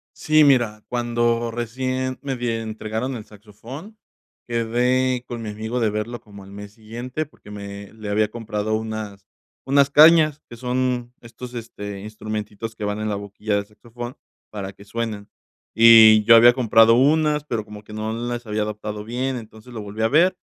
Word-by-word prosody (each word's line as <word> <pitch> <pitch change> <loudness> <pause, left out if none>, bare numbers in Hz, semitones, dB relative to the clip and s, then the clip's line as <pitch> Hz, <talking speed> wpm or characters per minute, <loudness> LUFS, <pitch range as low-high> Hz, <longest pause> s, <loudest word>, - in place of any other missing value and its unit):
Sí, 155 0 +4
mira, 120 -6 +3
cuando 120 -1 0
recién 130 +2 -3
me 135 -2 -3
die 120 -2 -2
entregaron 110 +3 -4
el 110 -3 -8
saxofón, 115 - -12 0.5
quedé 125 +2 +1
con 120 -1 -6
mi 110 - -5
amigo 110 +4 -4
de 115 -2 +2
verlo 105 +3 -4
como 100 -2 -14
al 95 - -14
mes 100 0 -10
siguiente 120 +7 -6
porque 140 -7 -17
me 100 0 -8
le 110 -2 -8
había 105 +1 +1
comprado 110 -1 -3
unas 110 -3 -5 0.4
unas 140 +1 +3
cañas 155 0 +6
que 120 - -10
son 125 0 -2
estos, 120 +1 -10
este, 105 -4 -7
instrumentitos 110 +1 -6
que 110 - -5
van 105 +1 -2
en 110 - -2
la 105 - -1
boquilla 100 +1 -3
del 100 0 -2
saxofón 120 +4 -9 0.3
para 100 -2 -6
que 100 - -16
suenen 105 -1 -5 0.5
y 110 -2 +8
yo 115 +2 +8
había 120 +1 +8
comprado 115 -2 +5
unas, 150 +3 +3
pero 115 -7 -3
como 105 0 -11
que 105 - -13
no 110 +1 -3
las 120 +1 -4
había 105 0 -1
adaptado 105 0 -5
bien. 125 +2 -2
Entonces, 110 +1 -12
lo 115 -3 -6
volví 105 +2 -7
a 110 - +3
ver 170 +9 +4
115 Hz, 175 wpm, -22 LUFS, 105-125 Hz, 0.5 s, y